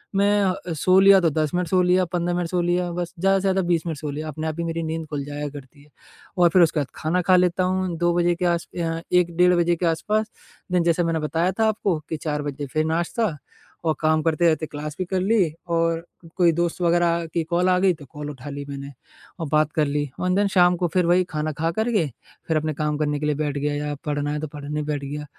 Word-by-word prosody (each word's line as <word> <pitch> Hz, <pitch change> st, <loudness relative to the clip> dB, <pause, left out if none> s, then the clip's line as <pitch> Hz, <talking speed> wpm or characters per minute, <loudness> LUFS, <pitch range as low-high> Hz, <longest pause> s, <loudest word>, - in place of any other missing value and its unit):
मैं 205 Hz, +1 st, +3 dB
अ, 180 Hz, -2 st, -2 dB
सो 185 Hz, +5 st, +4 dB
लिया 195 Hz, 0 st, +7 dB
तो 170 Hz, -, +3 dB
10 155 Hz, -1 st, -1 dB
मिनट 180 Hz, -1 st, 0 dB
सो 185 Hz, +2 st, +3 dB
लिया 180 Hz, +1 st, +3 dB
15 175 Hz, 0 st, -1 dB
मिनट 175 Hz, -1 st, -1 dB
सो 180 Hz, -1 st, 0 dB
लिया 175 Hz, 0 st, 0 dB
बस 175 Hz, 0 st, -4 dB
ज़्यादा 195 Hz, +2 st, +3 dB
से -, -, -5 dB
ज़्यादा 190 Hz, 0 st, +1 dB
20 170 Hz, -2 st, +1 dB
मिनट 160 Hz, -, -3 dB
सो 150 Hz, -, -4 dB
लिया, 155 Hz, +2 st, -5 dB
अपने 155 Hz, +1 st, -4 dB
आप 155 Hz, -, -3 dB
ही -, -, 0 dB
मेरी 165 Hz, 0 st, -3 dB
नींद 160 Hz, 0 st, -3 dB
खुल 145 Hz, -2 st, -3 dB
जाया 145 Hz, 0 st, -4 dB
करती 140 Hz, 0 st, -12 dB
है 150 Hz, -, -23 dB, 0.5 s
और 175 Hz, -1 st, +5 dB
फिर 180 Hz, +2 st, +4 dB
उसके 165 Hz, -2 st, +3 dB
बाद 140 Hz, -, -1 dB
खाना 170 Hz, +4 st, 0 dB
खा 185 Hz, +1 st, +4 dB
लेता 180 Hz, 0 st, +2 dB
हूँ, 185 Hz, -1 st, -1 dB
2 175 Hz, +1 st, +2 dB
बजे 175 Hz, 0 st, +2 dB
के 180 Hz, -, -2 dB
आस 170 Hz, -1 st, 0 dB
अ, 165 Hz, -1 st, -2 dB
1 175 Hz, -1 st, +2 dB
डेढ़ 180 Hz, 0 st, +5 dB
बजे 175 Hz, 0 st, +2 dB
के 175 Hz, -, -2 dB
आस-पास। 215 Hz, +6 st, 0 dB, 0.4 s
देन 180 Hz, -1 st, +2 dB
जैसे 170 Hz, +1 st, +2 dB
मैंने 165 Hz, -1 st, 0 dB
बताया 165 Hz, +4 st, 0 dB
था 220 Hz, -, +4 dB
आपको 200 Hz, -6 st, 0 dB
कि 160 Hz, -, -2 dB
4 150 Hz, -1 st, -3 dB
बजे 145 Hz, 0 st, -4 dB
फिर 155 Hz, 0 st, +1 dB
नाश्ता 170 Hz, +2 st, -1 dB, 0.5 s
और 160 Hz, -1 st, +2 dB
काम 155 Hz, 0 st, +2 dB
करते 165 Hz, +1 st, +2 dB
रहते 155 Hz, -1 st, +1 dB
क्लास 150 Hz, 0 st, -6 dB
भी 185 Hz, -, -1 dB
कर 185 Hz, +1 st, -1 dB
ली 190 Hz, -5 st, +2 dB, 0.2 s
और 165 Hz, 0 st, 0 dB, 0.3 s
कोई 175 Hz, -2 st, +5 dB
दोस्त 170 Hz, +2 st, -1 dB
वगैरह 170 Hz, 0 st, +2 dB
की 170 Hz, -, 0 dB
कॉल 175 Hz, +3 st, +1 dB
आ 180 Hz, -, +4 dB
गई, 185 Hz, -1 st, +3 dB
तो 150 Hz, -3 st, -12 dB
कॉल 150 Hz, +2 st, -8 dB
उठा 135 Hz, +1 st, -9 dB
ली 140 Hz, 0 st, -5 dB
मैंने 140 Hz, 0 st, -6 dB, 0.5 s
और 165 Hz, -, -3 dB
बात 155 Hz, 0 st, +2 dB
कर 155 Hz, -, +2 dB
ली। 145 Hz, +1 st, 0 dB, 0.2 s
एन 180 Hz, 0 st, +2 dB
देन 200 Hz, +1 st, +3 dB
शाम 180 Hz, 0 st, +5 dB
को 175 Hz, 0 st, 0 dB
फिर 180 Hz, -2 st, +2 dB
वही 180 Hz, +1 st, +4 dB
खाना 155 Hz, 0 st, -2 dB
खाकर 170 Hz, +9 st, 0 dB
के, 175 Hz, -7 st, +2 dB, 0.4 s
फिर 160 Hz, -, +1 dB
अपने 155 Hz, 0 st, -1 dB
काम 150 Hz, 0 st, -1 dB
करने 150 Hz, -1 st, 0 dB
के 150 Hz, -, -3 dB
लिए 150 Hz, -, +1 dB
बैठ 145 Hz, -1 st, -2 dB
गया 145 Hz, +1 st, -1 dB
या 150 Hz, -, -2 dB
पढ़ना 145 Hz, 0 st, -1 dB
है, 150 Hz, -, -2 dB
तो 155 Hz, -, -3 dB
पढ़ने 150 Hz, +1 st, -5 dB
बैठ 145 Hz, -1 st, -3 dB
गया 150 Hz, +1 st, -5 dB
165 Hz, 255 wpm, -23 LUFS, 150-180 Hz, 0.5 s, लिया